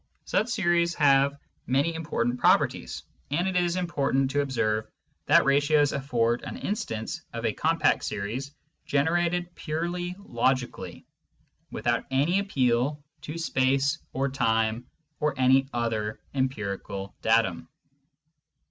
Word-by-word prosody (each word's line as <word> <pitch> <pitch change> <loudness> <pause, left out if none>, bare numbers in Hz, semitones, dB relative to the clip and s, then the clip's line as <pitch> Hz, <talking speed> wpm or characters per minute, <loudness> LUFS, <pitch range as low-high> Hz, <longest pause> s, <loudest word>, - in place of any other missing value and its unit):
Such 220 - +1
series 175 -6 +2
have 140 -1 +4 0.3
many 140 +6 +2
important 125 -7 -2
properties, - - +2 0.3
and 170 +7 0
it 190 - -2
is 175 -1 +2
important 140 -7 0
to 145 - +2
observe 110 -6 -1 0.4
that - - +6
ratios 145 +1 +3
afford 120 -4 0
an - - -6
instance 115 - -3
of 115 0 -4
a 110 - +1
compact 165 +7 +2
series 110 +7 -3 0.4
generated 175 +4 +1
purely 175 +3 -3
logically, 125 - -2 0.6
without - - -1
any 145 +8 +2
appeal 140 -5 0 0.2
to 150 +3 -6
space 135 -1 +1
or 135 +1 0
time 115 -2 0 0.3
or 150 -1 0
any 135 +1 +4
other 110 -3 -2
empirical 100 -7 -3
datum. 100 -8 +2
135 Hz, 115 wpm, -27 LUFS, 120-165 Hz, 0.6 s, that